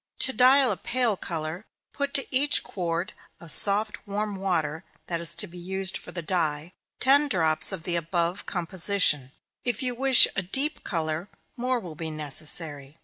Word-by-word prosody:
To 265 - +1
dye 255 +3 +5
a - - -1
pale 245 -4 -1
color, 165 +1 -6 0.3
put 280 -1 -4
to 275 - +3
each 290 +2 +3
quart 175 +1 -5 0.3
of 170 -2 -1
soft 205 +3 +4
warm 205 0 -4
water 170 -4 -2 0.2
that 170 -1 -4
is 170 - +1
to - - -2
be 175 -2 -13
used 190 +2 -3
for - - -7
the 170 - -6
dye, 160 -1 -3 0.3
ten 280 +3 +4
drops 160 - +2
of 190 -4 -6
the 175 0 -1
above 170 +2 -3
composition 175 -6 +1 0.3
if 245 0 -3
you 250 -1 -2
wish 260 +1 +7
a - - -1
deep 270 - +1
color, 165 +1 -4 0.3
more 250 +1 -2
will 175 -7 -10
be 160 +1 -6
necessary. 150 -1 +1
185 Hz, 170 wpm, -25 LUFS, 160-220 Hz, 0.3 s, wish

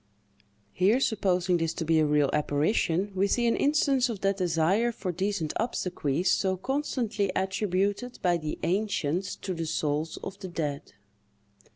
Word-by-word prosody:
Here, 200 +7 +3
supposing 185 -7 +1
this 165 -1 -1
to 165 - -3
be 160 0 +3
a 155 - +3
real 145 -2 +2
apparition, 160 +6 +1
we 190 +1 +2
see 240 +4 +1
an 230 - +3
instance 280 -3 +2
of 215 -5 -5
that 195 0 +1
desire 180 +6 +2
for 190 -5 -4
decent 185 -2 -2
obsequies 180 - -1
so 190 -1 +1
constantly 230 -4 -1
attributed 200 +5 -1
by 175 -2 +3
the 155 -2 -4
ancients 185 -2 -1
to 190 - -5
the 165 -2 -4
souls 155 +1 -1
of 195 0 -7
the 190 - -6
dead. 150 -5 -4
185 Hz, 155 wpm, -28 LUFS, 165-210 Hz, -, Here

